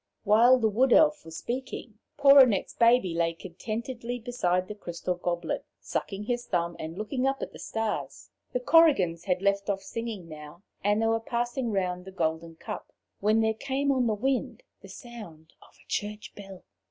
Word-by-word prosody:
While 230 +4 +6
the 225 -3 +2
Wood 240 +5 +3
Elf 305 -1 +4
was 165 0 -8
speaking, 240 -3 -5 0.2
poor 280 -1 +8
Annette's 235 -8 +4
baby 230 -6 +4
lay 165 0 +1
contentedly 230 +7 -5
beside 185 -7 -1
the 210 - -5
crystal 180 -3 -4
goblet, 175 -1 -3 0.2
sucking 200 0 -4
his 240 +2 -3
thumb 170 -1 -1
and 160 +2 -6
looking 250 +5 -1
up 270 0 -1
at - - -7
the - - -11
stars. 225 -1 -4 0.2
The 250 - -1
Korrigans 250 - +4
had 185 -1 0
left 200 0 +1
off 195 -1 -1
singing 215 -3 -5
now, 155 +3 -11 0.2
and 205 +1 +2
they 225 - +1
were 225 0 +2
passing 240 +1 -2
round 180 -2 -1
the 190 - -9
golden 165 -2 -2
cup - - -8 0.3
when 215 +2 +3
there 220 0 +2
came 275 +4 -1
on 255 -3 +2
the 215 - +1
wind 265 - -1 0.2
the - - -13
sound 190 - -11
of - - -20
a - - -24
church 210 0 -4
bell. 195 -2 -11
215 Hz, 180 wpm, -28 LUFS, 180-245 Hz, 0.3 s, poor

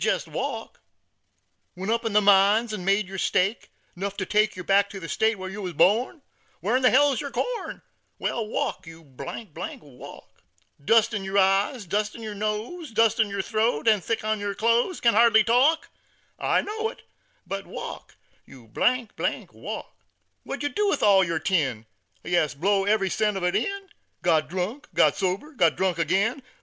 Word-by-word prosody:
Jest - - 0
walk! - - -5 0.9
"Went 190 +4 -3
up 230 +1 0
in 225 - -1
the 210 - +5
mines 205 +3 +4
an' 195 -4 -5
made 195 +1 +1
yer 190 0 -6
stake, 195 +6 0 0.3
'Nuff 200 +2 -4
to 190 - -2
take 215 +2 +2
yer 185 - -7
back 200 +2 +3
to 200 - -8
ther 165 - -7
state 220 +3 +1
Whar 185 0 -6
yer 195 +2 -7
wur 180 -3 -4
born. 220 - +2 0.4
Whar'n 235 +9 0
hell's 270 0 +4
yer 280 - -5
corn? - - -4 0.3
Wal, 230 -2 -2
walk, 210 - -3
you, 165 0 -12
walk! 150 - -9 0.4
"Dust 225 +6 +4
in 205 -2 -2
yer 195 +1 -2
eyes, 195 +4 +2
dust 210 +4 -1
in 230 - -9
yer 215 -1 -5
nose, 215 - -4
Dust 225 -1 +2
down 220 -2 +3
yer 200 -1 -3
throat, 215 -6 0
and 210 -4 +4
thick 225 -2 -2
On 215 0 -1
yer 205 -1 -3
clothes. 235 - +1
Can't 235 -3 +3
hardly 220 -1 +6
talk? 265 +9 +3 0.5
I - - +1
know 440 +2 -3
it, - - -13 0.4
but - - -5
walk, - - -8 0.3
you, 120 -5 -16
walk! 250 -3 -2 0.5
"What - - -6
did - - -4
yer 290 - -2
do 420 0 +1
with - - 0
all 195 -2 +6
yer 170 -2 -1
tin? 145 - 0 0.4
Ya 175 0 +2
s, 150 -1 -1
blew 195 +5 +1
every 200 -3 +2
cent 210 -2 0
of 190 - -4
it 180 - +1
in; 395 -1 -2 0.3
Got 155 -4 +2
drunk, 190 - -4
got - - +4
sober, 195 +10 -2
got 170 - +2
drunk 185 -3 0
agin. 195 - +1
205 Hz, 185 wpm, -25 LUFS, 185-230 Hz, 0.9 s, hardly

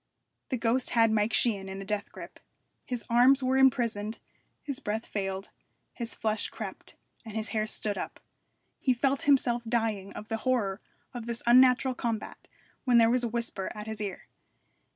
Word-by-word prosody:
The 255 - 0
ghost 240 +2 +1
had 225 -1 +5
Mike 215 +1 +2
Sheehan 200 -6 +1
in 190 0 -6
a 195 - -7
death 210 0 -3
grip. - - -10 0.5
His 245 -2 -3
arms 255 +3 +5
were 260 +1 +2
imprisoned, 235 -5 +2 0.5
his 280 -2 -4
breath 220 -3 -3
failed, 195 -1 -4 0.4
his 235 -2 -4
flesh 215 -1 0
crept, - - -8 0.3
and 220 -3 -9
his 220 0 -2
hair 215 -1 -1
stood 205 -2 -2
up. - - -6 0.6
He 255 -2 +2
felt 275 +2 +1
himself 245 -4 +4
dying 225 -4 -1
of 210 - -8
the 225 - -2
horror 220 -5 0 0.3
of 240 -2 -6
this 235 0 -3
unnatural 255 +1 +6
combat, 230 -3 -4 0.4
when 250 -3 +4
there 230 0 +6
was 250 0 +2
a - - +1
whisper 230 -4 -2
at 210 0 -6
his 220 -1 -5
ear. 200 -2 -5
230 Hz, 170 wpm, -29 LUFS, 210-250 Hz, 0.6 s, unnatural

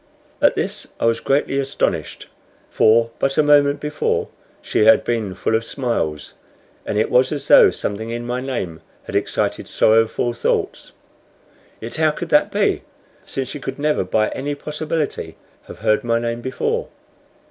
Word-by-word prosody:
At - - +4
this - - -3
I - - 0
was 115 0 +2
greatly 135 0 0
astonished; 135 0 -2 0.5
for 115 +1 +4
but 135 0 0
a 155 - +5
moment 145 -1 +4
before 150 0 -1 0.3
she 105 - +1
had 110 - +6
been 110 -5 -2
full - - -1
of 110 +1 +2
smiles, 115 - -3 0.5
and - - -1
it 110 - +1
was 130 +1 +4
as 145 -2 -4
though - - +8
something 110 +2 -4
in 120 +1 -4
my 125 +1 -2
name 95 -12 -4 0.2
had - - -8
excited - - -1
sorrowful 115 +2 +2
thoughts. 120 - -2 0.9
Yet 115 +6 -6
how 155 -1 +3
could 165 +2 -5
that 150 - +3
be, - - +1 0.5
since 135 -1 -3
she 145 - -6
could 135 0 -6
never 150 -4 +1
by 110 +4 +1
any 145 +2 -4
possibility 150 +1 -4 0.3
have - - -10
heard 110 +5 +3
my 115 -1 +1
name 115 0 -3
before? 450 - -2
125 Hz, 160 wpm, -20 LUFS, 115-145 Hz, 0.9 s, though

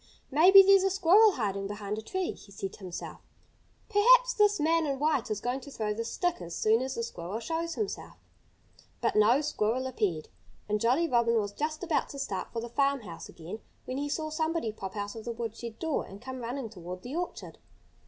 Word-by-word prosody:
"Maybe 370 +7 +9
there's 390 0 +6
a 385 - +2
squirrel 390 +3 +5
hiding 200 - -2
behind 205 +1 -4
a - - -6
tree," 370 +11 -2
he 200 - -14
said 195 -1 -5
to - - -13
himself. 185 -3 -7 0.7
"Perhaps - - +5
this 415 -2 +3
man 325 +1 +2
in 275 -1 -1
white 285 -4 +1
is 215 -2 -2
going 245 +4 -2
to 280 - -10
throw 215 -6 -2
the 230 +2 -3
stick 350 - -1
as 170 -1 -6
soon 220 +2 +3
as 265 0 -3
the 230 - -2
squirrel 195 -2 -5
shows 330 +5 -3
himself." 420 -2 -4 0.8
But - - 0
no 225 +6 +5
squirrel 260 -4 0
appeared. 200 -11 -2 0.4
And 210 0 0
Jolly 260 +9 +3
Robin 235 -3 +3
was 205 -1 -3
just 305 - -3
about 335 -3 0
to 280 - -8
start 200 -9 -4
for 230 - -3
the 235 - -5
farmhouse 270 -9 -1
again 175 +6 -8 0.3
when 255 +1 -3
he 290 0 -2
saw 310 +1 -2
somebody 315 -6 -1
pop 195 -2 -7
out 205 +1 -4
of 225 - -7
the 235 - -4
woodshed 230 0 -6
door 320 -2 -1
and 195 - -11
come 260 +2 -7
running 240 -1 -4
toward 180 -2 -8
the 255 +5 -6
orchard. 355 +1 -5
245 Hz, 205 wpm, -29 LUFS, 210-320 Hz, 0.8 s, Maybe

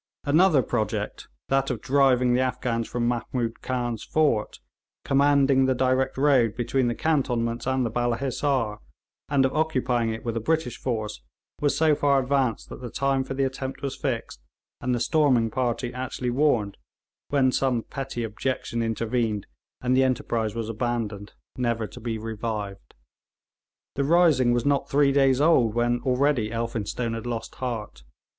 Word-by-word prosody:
Another 155 -1 +4
project, 110 -3 -3 0.2
that 135 0 +2
of 125 -4 -2
driving 130 -1 +3
the 125 - +2
Afghans 125 -2 -1
from 120 -1 -1
Mahmood 120 -1 -2
Khan's 120 -3 -2
fort, 145 -9 0 0.5
commanding 140 -1 +4
the 130 0 +2
direct 130 +1 +1
road 135 -6 +3
between 125 +1 0
the 120 - -1
cantonments 120 -7 0
and 130 -1 +1
the 115 - -2
Balla 120 0 0
Hissar, 130 -4 -1 0.5
and 140 -2 +3
of 130 - 0
occupying 130 -7 +1
it 110 +2 -6
with 115 -1 -2
a - - 0
British 155 0 -1
force, 110 - -3 0.4
was 145 -1 +1
so 160 -1 +4
far 140 -1 +3
advanced 130 -3 0
that - - -9
the 125 - -6
time 135 +2 0
for 135 - -6
the 135 - +1
attempt 135 0 -4
was 140 - -2
fixed, 115 - -4 0.4
and 125 0 0
the - - -1
storming 125 -4 +2
party 120 0 -1
actually 125 -1 -3
warned, 120 -7 +1 0.5
when 135 -2 +3
some 125 -3 0
petty 135 -3 -5
objection 115 +1 -3
intervened 115 -2 -1 0.4
and 125 0 +1
the 130 - +4
enterprise 115 -4 -1
was 115 -2 -3
abandoned, 110 -3 -3 0.2
never 120 -3 0
to - - -10
be 115 -1 -3
revived. 110 -2 -5 1.0
The 140 - -1
rising 150 -5 +4
was 120 -1 0
not 140 -1 +1
three 140 0 +4
days 135 -2 +3
old 130 -8 +4
when 120 0 +1
already 130 -3 +1
Elphinstone 115 0 -3
had 115 +1 -5
lost 115 -2 -4
heart. 115 - -4
125 Hz, 160 wpm, -25 LUFS, 115-135 Hz, 1.0 s, Another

